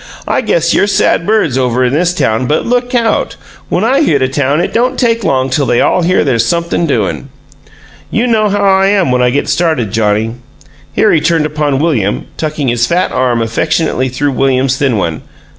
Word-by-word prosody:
"I - - 0
guess - - 0
you're - - +2
sad 195 -4 +1
birds 185 - +1
over 125 0 0
in 125 - -1
this 175 +4 +1
town, 125 -8 -1
but 150 - 0
look 245 +1 -1
out! 230 -2 0 0.3
When 185 - 0
I 265 +5 +2
hit 145 - +2
a - - +2
town 140 +2 0
it 175 - -2
don't 245 +2 0
take 230 -2 0
long 130 -5 0
till 140 0 0
they 120 - +2
all 185 - +2
hear 180 +2 +2
there's 125 -5 +1
something 170 0 -1
doin'! 95 - -2 0.8
You 230 - 0
know 220 -3 +1
how 205 0 -1
I 195 0 +3
am 195 -8 +1
when 125 0 +1
I 125 - +3
get 140 +3 -1
started, 160 - 0
Johnnie!" 110 +1 0 0.6
Here - - +2
he 155 - +2
turned 160 -1 +1
upon 150 -2 -1
William, 130 - -1
tucking 155 -4 -2
his 120 0 0
fat 180 +2 0
arm 125 -2 0
affectionately 130 +3 -1
through 140 +3 -1
William's 130 0 +1
thin 135 -5 0
one. 85 -5 -2
145 Hz, 200 wpm, -12 LUFS, 125-185 Hz, 0.8 s, I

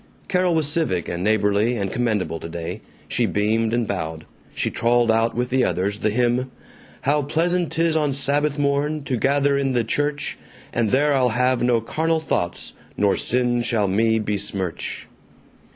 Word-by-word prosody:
Carol 180 -2 +1
was 160 -2 +2
civic 145 - 0
and 85 +1 -3
neighborly 105 +2 +2
and 100 -2 -2
commendable 105 -9 -1
today. 85 0 -6 0.3
She - - +1
beamed 110 +2 +1
and 120 -1 0
bowed. 80 -5 -4 0.3
She - - -2
trolled 120 0 +2
out 115 +1 +1
with 125 +1 -2
the 130 0 +3
others 100 +3 -1
the 110 - +1
hymn: 120 +3 +1 0.5
How 145 +3 +2
pleasant 170 +4 0
'tis 165 0 +1
on 150 -3 +1
Sabbath 145 +1 +1
morn 145 +1 0
To 135 - -2
gather 140 +3 +2
in 135 -1 0
the 120 -2 +2
church 145 +5 -2 0.3
And 115 -2 +1
there 145 +4 +3
I'll 130 -2 +3
have 125 +2 +1
no 120 -2 +2
carnal 160 +7 0
thoughts, 85 - -3 0.2
Nor 100 -1 +3
sin 120 0 +1
shall 115 -3 +1
me 110 +4 +2
besmirch. 100 -4 -3
120 Hz, 165 wpm, -22 LUFS, 105-145 Hz, 0.5 s, the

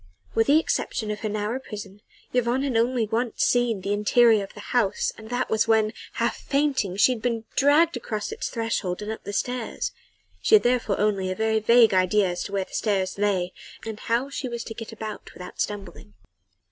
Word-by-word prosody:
With 225 - +2
the 290 +2 +6
exception 220 -8 -2
of 210 - -4
her 215 - -3
narrow 215 +4 -2
prison 205 -5 -9 0.3
Yvonne 250 +2 +1
had 270 -4 -1
only 235 0 +2
once 230 +2 -1
seen 240 -5 +2
the 200 +2 -1
interior 215 +1 +4
of 195 - -11
the - - -10
house 230 -6 +1
and 220 0 -12
that 245 +1 -1
was 220 - +1
when, 220 -1 +3 0.2
half - - -1
fainting, 275 -10 0
she 210 - +5
had 240 -3 -3
been 230 -2 -1
dragged 295 +3 +4
across 220 - -4
its 440 - -4
threshold 220 -5 -2
and 210 - -4
up 220 - -7
the - - -4
stairs. 245 +3 -2 0.5
She 435 - +6
had 430 - +5
therefore 240 -4 +1
only 200 -2 +1
a 185 - -2
very 220 +1 +1
vague 230 0 +5
idea 185 +1 +3
as 175 0 -3
to - - -7
where 195 -1 -1
the - - -20
stairs 200 -3 -1
lay 190 -3 0 0.3
and 220 -1 -5
how 245 +4 -1
she 270 -2 -4
was 235 -1 -4
to 225 - -7
get 225 0 -8
about 220 -1 -7
without 180 0 -7
stumbling. 195 - -5
220 Hz, 205 wpm, -25 LUFS, 205-245 Hz, 0.5 s, the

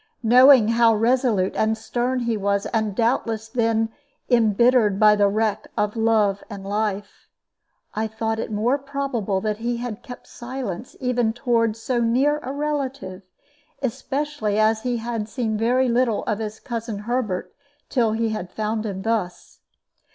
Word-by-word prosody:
Knowing 250 0 +7
how 230 -1 +4
resolute 225 -4 +1
and 220 0 +1
stern 245 +3 -2
he 235 -1 0
was, 200 0 0
and 220 -3 0
doubtless 230 -1 0
then 225 -1 0 0.4
imbittered 225 -2 +4
by 210 -1 +6
the 205 -1 +3
wreck 215 +1 -1
of 210 +1 0
love 220 -3 +2
and 200 -2 -8
life, 205 0 -3 0.7
I 220 +1 -1
thought 220 0 -3
it 220 - -4
more 235 +7 +1
probable 270 -8 -2
that 215 0 -1
he 235 +1 -2
had 240 -2 -5
kept 245 0 -10
silence 240 -4 -6
even 245 -3 0
toward 230 -3 +1
so 240 +2 -1
near 265 +6 +2
a 265 -3 -6
relative, 275 -9 -3 0.6
especially 265 -3 -2
as 220 0 +3
he 245 0 -1
had 225 -2 -4
seen 220 -1 -2
very 245 +4 +2
little 235 -2 +1
of 210 -1 -2
his 215 0 -5
cousin 230 -4 -5
Herbert 235 -6 -2 0.3
till 230 -5 +1
he 225 0 0
had 215 -5 -4
found 215 +2 -2
him 190 -2 -5
thus. 215 -5 -3
225 Hz, 150 wpm, -23 LUFS, 215-245 Hz, 0.7 s, Knowing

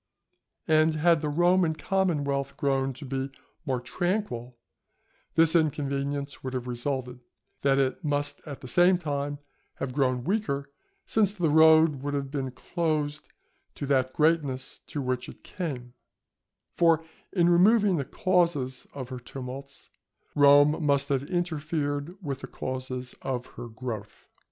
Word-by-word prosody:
And 155 0 +4
had 165 0 +3
the 150 - -1
Roman 175 +1 +3
commonwealth 150 -8 0
grown 135 -1 +1
to 140 +3 -9
be 135 +1 -3 0.4
more 130 -2 0
tranquil, 125 - -2 0.8
this 165 0 +5
inconvenience 140 -2 -1
would 130 0 -4
have 125 -1 -3
resulted, 125 0 -3 0.4
that 135 -1 +3
it 135 +6 0
must 145 -1 -1
at 140 -2 -7
the 130 - -8
same 180 +7 +5
time 145 -3 -3 0.4
have 130 -2 -4
grown 130 -3 +1
weaker, 145 - -1 0.3
since 205 -3 +2
the 175 -7 0
road 160 -2 +6
would 145 +1 -2
have 140 -1 -3
been 135 -3 -2
closed 150 +2 -2 0.5
to - - -4
that 130 -2 +1
greatness 150 -5 +1
to 145 -4 -4
which 125 0 -2
it - - -13
came, 130 -9 -5 0.8
for 165 -2 +3 0.3
in 175 -3 +3
removing 195 +2 +5
the 140 - 0
causes 170 -9 0
of 130 -3 -6
her 130 -2 -6
tumults, 135 +2 -8 0.4
Rome 145 +2 +6
must 140 -1 +2
have 140 -1 0
interfered 155 -2 -2
with 140 -4 -3
the - - -7
causes 130 -1 -5
of 125 -2 -3
her 120 - -7
growth. 110 -3 -7
145 Hz, 140 wpm, -27 LUFS, 130-165 Hz, 0.8 s, road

